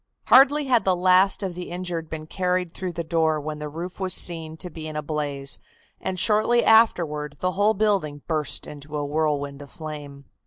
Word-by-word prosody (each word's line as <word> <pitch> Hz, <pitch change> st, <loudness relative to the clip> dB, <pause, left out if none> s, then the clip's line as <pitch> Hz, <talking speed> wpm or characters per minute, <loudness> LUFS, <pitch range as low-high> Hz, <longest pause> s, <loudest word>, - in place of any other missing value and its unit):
Hardly 280 Hz, +3 st, +6 dB
had 250 Hz, -4 st, +3 dB
the 190 Hz, -1 st, +2 dB
last 185 Hz, +3 st, +4 dB
of 190 Hz, -2 st, -3 dB
the 180 Hz, +1 st, -7 dB
injured 175 Hz, -2 st, -4 dB
been 155 Hz, -1 st, -6 dB
carried 180 Hz, 0 st, -1 dB
through 185 Hz, -2 st, -5 dB
the 170 Hz, 0 st, -3 dB
door 160 Hz, -1 st, +1 dB
when 150 Hz, +1 st, -5 dB
the 150 Hz, 0 st, -5 dB
roof 170 Hz, +5 st, -7 dB
was 190 Hz, -1 st, 0 dB
seen 160 Hz, -2 st, +1 dB
to 180 Hz, +1 st, -8 dB
be 155 Hz, -1 st, -7 dB
in 155 Hz, -, -7 dB
a 150 Hz, -, -3 dB
blaze, 145 Hz, -2 st, -3 dB, 0.4 s
and 185 Hz, -1 st, -4 dB
shortly 220 Hz, +4 st, +3 dB
afterward 160 Hz, -10 st, +3 dB
the 185 Hz, -, 0 dB
whole 205 Hz, +4 st, +2 dB
building 190 Hz, -9 st, 0 dB
burst 155 Hz, -4 st, -1 dB
into 150 Hz, +1 st, -8 dB
a 145 Hz, -, -2 dB
whirlwind 145 Hz, -2 st, -1 dB
of 140 Hz, -, -11 dB
flame. 145 Hz, -3 st, -9 dB
165 Hz, 195 wpm, -24 LUFS, 150-185 Hz, 0.4 s, Hardly